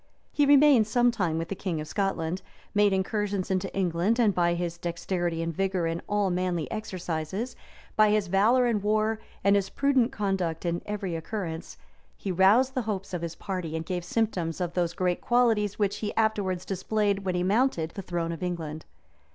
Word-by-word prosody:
He 290 -1 +2
remained 280 -6 +6
some 240 +2 +3
time 180 -8 -1
with 165 +1 -3
the 195 - -3
king 180 -4 -3
of 155 - -5
Scotland, 185 -3 -1 0.3
made 205 -1 +4
incursions 195 0 -1
into 185 -1 -1
England, 185 +3 +1
and 225 -5 +3
by 175 -1 +2
his 170 -1 -3
dexterity 170 0 -2
and 165 0 -2
vigor 190 -2 0
in 165 +1 -2
all 205 -2 +1
manly 175 -3 -1
exercises, 190 +1 -4 0.4
by 215 -1 +5
his 210 -1 +2
valor 215 +7 +3
in 230 -4 +1
war, 215 +1 +1 0.2
and 200 +1 +5
his 195 -1 +1
prudent 270 -3 +2
conduct 190 -5 -2
in 170 0 -1
every 200 -4 -3
occurrence, 165 -1 -5 0.4
he 195 - -3
roused 205 +9 +4
the 255 - 0
hopes 200 -4 -4
of 175 - -2
his 170 -1 -4
party, 180 -5 -4
and 160 0 -3
gave 180 0 -3
symptoms 180 -5 -1
of 175 -2 -2
those 175 -2 0
great 180 -2 0
qualities 225 -4 +2
which 205 -2 0
he 210 - -4
afterwards 200 -5 0
displayed 200 +1 0
when 190 -2 -2
he 180 - 0
mounted 195 -5 +1
the 195 - -6
throne 170 -2 -2
of 165 - -6
England. 160 -4 -4
190 Hz, 185 wpm, -27 LUFS, 175-215 Hz, 0.4 s, remained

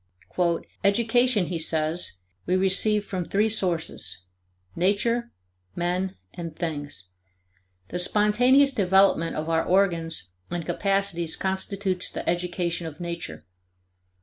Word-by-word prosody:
"Education," 225 +1 +3
he 170 -1 -3
says, 160 - +1 0.3
"we 180 - +2
receive 200 +3 +3
from 185 -3 -3
three 210 +5 +1
sources 175 - 0 0.5
Nature, 230 +6 +1 0.5
men, 180 +2 -1 0.2
and 165 -2 -7
things. 145 - -4 0.8
The 180 - -2
spontaneous 245 +9 +4
development 190 -5 +3
of 155 +1 -3
our 165 0 +1
organs 170 - 0 0.2
and 175 -1 -4
capacities 195 -2 0
constitutes 190 -1 -1
the - - -6
education 175 -1 -1
of 155 -2 -10
Nature. 170 - -6
180 Hz, 105 wpm, -25 LUFS, 165-200 Hz, 0.8 s, spontaneous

